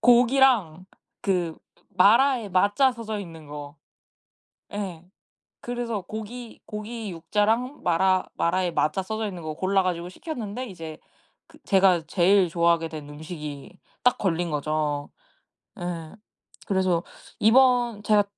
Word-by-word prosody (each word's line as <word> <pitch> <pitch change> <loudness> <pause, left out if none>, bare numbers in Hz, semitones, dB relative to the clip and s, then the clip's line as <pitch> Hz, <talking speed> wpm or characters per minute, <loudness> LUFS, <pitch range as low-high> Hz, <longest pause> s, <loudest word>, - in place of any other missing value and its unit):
고기랑 240 - +4 0.4
그 175 -4 0 0.3
마라에 225 +5 +4
마 200 +3 +3
자 265 -2 +4
써져 220 -3 -5
있는 165 -5 -10
거. 145 +1 -8 1.0
예. 185 -5 -5 0.6
그래서 240 -3 -3
고기 220 +3 -8
고기 215 0 -6
육 165 -1 -12
자랑, 225 +6 +1
마라 185 +2 +3
마라에 180 +1 0
마 155 - +2
자 190 - -2
써져 220 +3 -3
있는 180 -4 -7
거 155 -1 -4
골라 190 +3 +2
가지고 175 -1 -2
시켰는데 250 - -5
이제 165 -6 -8 0.5
그 - - -18
제가 190 -4 +4
제일 185 0 +4
좋아하게 170 -1 +2
된 150 -2 -8
음식이 150 +1 -8 0.3
딱 250 - +4
걸린 175 -3 0
거죠. 150 -1 -1 0.7
예. 170 -3 -5 0.5
그래서 185 -3 +1 0.4
이번 240 -3 +4
제가 210 -1 +4
190 Hz, 240 characters per minute, -25 LUFS, 165-220 Hz, 1.0 s, 고기랑